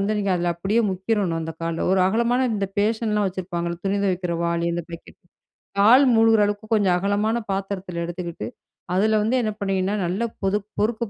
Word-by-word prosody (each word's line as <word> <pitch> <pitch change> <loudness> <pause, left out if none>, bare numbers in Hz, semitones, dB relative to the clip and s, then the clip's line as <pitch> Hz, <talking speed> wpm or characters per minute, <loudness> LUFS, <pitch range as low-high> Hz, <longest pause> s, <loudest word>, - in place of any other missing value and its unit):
வந்து 210 +2 0
நீங்க 200 -1 0
அதுல 175 0 0
அப்படியே 195 +6 +1
முக்கிரணும் 190 -3 -1
அந்த 160 0 -5
கால். 165 0 -2
1 190 - +3
அகலமான 235 +5 +2
இந்த 200 -1 -2
பேசன்ல்லாம் 215 -1 +1
வச்சிருப்பாங்களே, 175 -2 -4
துணி 200 +1 +1
துவைக்கிற 180 -2 -1
வாளி 170 0 0
அந்த 170 -1 -3
பக்கெட், 170 0 -11 0.6
கால் 250 +7 +7
மூழ்கிற 225 -1 +5
அளவுக்கு 205 +2 -3
கொஞ்சம் 195 -4 +3
அகலமான 205 +4 0 0.2
பாத்திரத்துல 190 -3 -4
எடுத்துக்கிட்டு 170 - -5 0.5
அதுல 215 +4 +3
வந்து 225 +5 +1
என்ன 215 -2 -1
பண்ணீங்கன்னா, 195 0 0
நல்லா 190 +7 -1 0.2
பொது 195 +1 +2 0.2
பொறுக்கப் 220 +1 0
195 Hz, 170 wpm, -23 LUFS, 175-215 Hz, 0.6 s, கால்